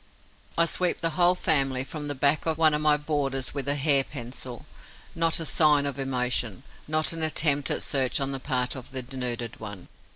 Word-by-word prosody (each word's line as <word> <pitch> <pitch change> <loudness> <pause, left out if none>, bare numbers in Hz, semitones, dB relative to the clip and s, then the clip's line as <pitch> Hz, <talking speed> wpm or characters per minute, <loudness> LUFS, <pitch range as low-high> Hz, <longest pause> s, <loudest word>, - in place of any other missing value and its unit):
I 170 - +5
sweep 175 +2 0
the 165 - -1
whole 175 +3 +4
family 135 -7 +1
from 150 +2 -6
the 145 - -3
back 145 +4 +2
of 160 -1 +1
one 160 -2 +4
of 150 - +1
my 150 -1 +4
boarders 140 -3 -2
with 140 -1 -4
a 140 - +3
hair 140 -1 +4
pencil. 125 -2 -6 0.5
Not 165 0 +2
a 165 - -3
sign 150 -3 +3
of 140 -1 -3
emotion, 125 -4 -1 0.2
not 155 +2 +1
an 165 - -4
attempt 145 -2 +1
at - - 0
search 135 -3 +1
on 135 0 -2
the 135 - -4
part 125 -2 -1
of 130 - -9
the 130 -1 -3
denuded 120 -3 -4
one. 105 -4 -9
140 Hz, 200 wpm, -26 LUFS, 130-155 Hz, 0.5 s, I